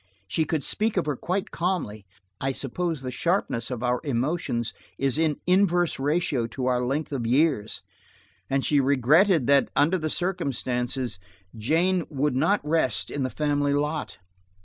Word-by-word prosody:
She 155 Hz, +11 st, 0 dB
could 155 Hz, -1 st, -1 dB
speak 215 Hz, +6 st, 0 dB
of 180 Hz, -, +1 dB
her 150 Hz, -2 st, -1 dB
quite 190 Hz, +9 st, -3 dB
calmly–I 105 Hz, -, -4 dB
suppose 160 Hz, +4 st, -3 dB
the 130 Hz, -1 st, -4 dB
sharpness 145 Hz, -, -1 dB
of 125 Hz, -2 st, -4 dB
our 125 Hz, 0 st, +1 dB
emotions 125 Hz, -3 st, -1 dB, 0.2 s
is 135 Hz, +2 st, +1 dB
in 155 Hz, -3 st, +1 dB
inverse 180 Hz, -3 st, +2 dB
ratio 145 Hz, -4 st, 0 dB
to 125 Hz, +3 st, -5 dB
our 125 Hz, -1 st, +1 dB
length 140 Hz, +5 st, -2 dB
of 125 Hz, -5 st, -2 dB
years, 130 Hz, -4 st, +1 dB, 0.7 s
and 135 Hz, 0 st, 0 dB
she 145 Hz, -, +3 dB
regretted 140 Hz, -, +4 dB
that, 140 Hz, +1 st, +4 dB
under 170 Hz, +6 st, +3 dB
the 155 Hz, -1 st, -2 dB
circumstances, 130 Hz, -, -2 dB, 0.4 s
Jane 165 Hz, +11 st, +1 dB
would 145 Hz, -1 st, 0 dB
not 150 Hz, +4 st, +1 dB
rest 130 Hz, -, +1 dB
in 145 Hz, -, -3 dB
the 130 Hz, -, 0 dB
family 145 Hz, 0 st, 0 dB
lot. 150 Hz, +2 st, -2 dB
145 Hz, 150 wpm, -25 LUFS, 125-165 Hz, 0.7 s, regretted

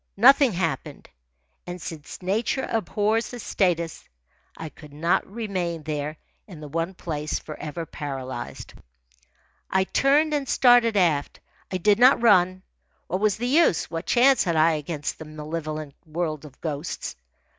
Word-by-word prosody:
Nothing 265 Hz, +2 st, +6 dB
happened. 165 Hz, -7 st, -3 dB, 0.6 s
And, 180 Hz, 0 st, -6 dB
since 160 Hz, +2 st, -8 dB
nature 220 Hz, +8 st, 0 dB
abhors 220 Hz, +1 st, 0 dB
a -, -, -8 dB
status, 170 Hz, -6 st, -1 dB, 0.5 s
I 160 Hz, -, -6 dB
could 150 Hz, -1 st, -15 dB
not 165 Hz, +5 st, 0 dB
remain 185 Hz, -7 st, -3 dB
there 150 Hz, 0 st, -3 dB, 0.3 s
in 180 Hz, -7 st, -11 dB
the 150 Hz, -, -8 dB
one 165 Hz, +5 st, -3 dB
place 155 Hz, -4 st, -3 dB
forever 155 Hz, +1 st, -6 dB
paralysed. 135 Hz, -4 st, -6 dB, 1.0 s
I 190 Hz, 0 st, +2 dB
turned 290 Hz, +9 st, +2 dB
and 285 Hz, -3 st, -1 dB
started 245 Hz, -3 st, +5 dB
aft. 160 Hz, -6 st, +1 dB, 0.3 s
I 185 Hz, -, 0 dB
did 205 Hz, +4 st, +3 dB
not 255 Hz, +2 st, +7 dB
run. 185 Hz, -5 st, +4 dB, 0.4 s
What 185 Hz, -, -2 dB
was 210 Hz, -1 st, +2 dB
the 240 Hz, -, -3 dB
use? 270 Hz, -, +3 dB
What 165 Hz, +1 st, -4 dB
chance 260 Hz, +2 st, +5 dB
had 170 Hz, -3 st, 0 dB
I 160 Hz, +1 st, +5 dB
against 150 Hz, -1 st, -4 dB
the 160 Hz, -, -8 dB
malevolent 155 Hz, -1 st, -5 dB
world 155 Hz, -2 st, -3 dB
of 135 Hz, -3 st, -14 dB
ghosts? 155 Hz, 0 st, -4 dB
175 Hz, 145 wpm, -25 LUFS, 155-215 Hz, 1.0 s, not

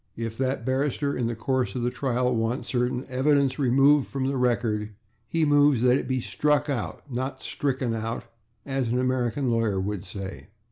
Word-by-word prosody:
If 115 Hz, -1 st, -4 dB
that 130 Hz, -2 st, -1 dB
barrister, 140 Hz, +2 st, 0 dB
in 120 Hz, -2 st, 0 dB
the 115 Hz, -, -2 dB
course 130 Hz, +3 st, -1 dB
of 125 Hz, -, -2 dB
the 120 Hz, -, +1 dB
trial, 125 Hz, -2 st, 0 dB
wants 115 Hz, +3 st, -1 dB
certain 125 Hz, 0 st, 0 dB
evidence 135 Hz, +1 st, +2 dB
removed 140 Hz, +2 st, +4 dB
from 135 Hz, -1 st, -3 dB
the 135 Hz, +1 st, 0 dB
record, 115 Hz, -4 st, 0 dB, 0.3 s
he 165 Hz, +2 st, +1 dB
moves 145 Hz, -4 st, +4 dB
that 125 Hz, 0 st, +5 dB
it -, -, -1 dB
be 130 Hz, -, 0 dB
/struck 145 Hz, +4 st, +1 dB
out/, 105 Hz, -, -3 dB
not 130 Hz, +1 st, -4 dB
/stricken 130 Hz, -4 st, -1 dB
out/, 115 Hz, +1 st, -3 dB, 0.4 s
as 135 Hz, -3 st, -1 dB
an 120 Hz, +2 st, 0 dB
American 130 Hz, 0 st, 0 dB
lawyer 115 Hz, -4 st, +1 dB
would 100 Hz, 0 st, -3 dB
say. 95 Hz, 0 st, -7 dB
125 Hz, 180 wpm, -26 LUFS, 115-135 Hz, 0.4 s, that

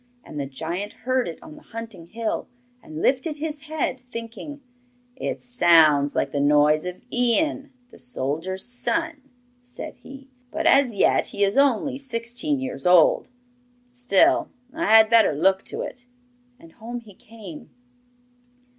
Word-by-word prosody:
And 150 Hz, -, -8 dB
the 140 Hz, -, -3 dB
giant 170 Hz, +9 st, -5 dB
heard 255 Hz, 0 st, +1 dB
it 165 Hz, -, -6 dB
on 310 Hz, -1 st, -12 dB
the 305 Hz, -, -14 dB
hunting 225 Hz, -, -9 dB
hill, 225 Hz, +3 st, -3 dB, 0.3 s
and 155 Hz, +1 st, -8 dB
lifted 275 Hz, +4 st, +1 dB
his 300 Hz, -1 st, -5 dB
head, 300 Hz, -4 st, -3 dB
thinking 230 Hz, +6 st, -8 dB, 0.5 s
'It -, -, -4 dB
sounds 165 Hz, -, +4 dB
like -, -, 0 dB
the 145 Hz, -, -2 dB
noise 150 Hz, +2 st, +3 dB
of 180 Hz, 0 st, -7 dB
Ian, 270 Hz, +4 st, +1 dB, 0.2 s
the -, -, -16 dB
soldier's 185 Hz, -, -3 dB
son,' 275 Hz, +4 st, -2 dB, 0.3 s
said 245 Hz, 0 st, -8 dB
he; 270 Hz, 0 st, -13 dB, 0.2 s
'but -, -, -4 dB
as 265 Hz, -5 st, +4 dB
yet -, -, +3 dB
he 200 Hz, -, -1 dB
is 200 Hz, +2 st, +1 dB
only 275 Hz, 0 st, +2 dB
sixteen 245 Hz, +3 st, -2 dB
years 260 Hz, -8 st, -3 dB
old. 180 Hz, -3 st, +5 dB, 0.6 s
Still, 245 Hz, -5 st, +2 dB, 0.2 s
I 330 Hz, +1 st, -2 dB
had 220 Hz, 0 st, +7 dB
better 225 Hz, -7 st, +4 dB
look 190 Hz, +6 st, +2 dB
to -, -, -3 dB
it.' 245 Hz, 0 st, -8 dB, 0.5 s
And 165 Hz, -, -16 dB
home 235 Hz, +6 st, -8 dB
he 215 Hz, -3 st, -16 dB
came. 205 Hz, -6 st, -12 dB
230 Hz, 145 wpm, -23 LUFS, 180-265 Hz, 0.6 s, had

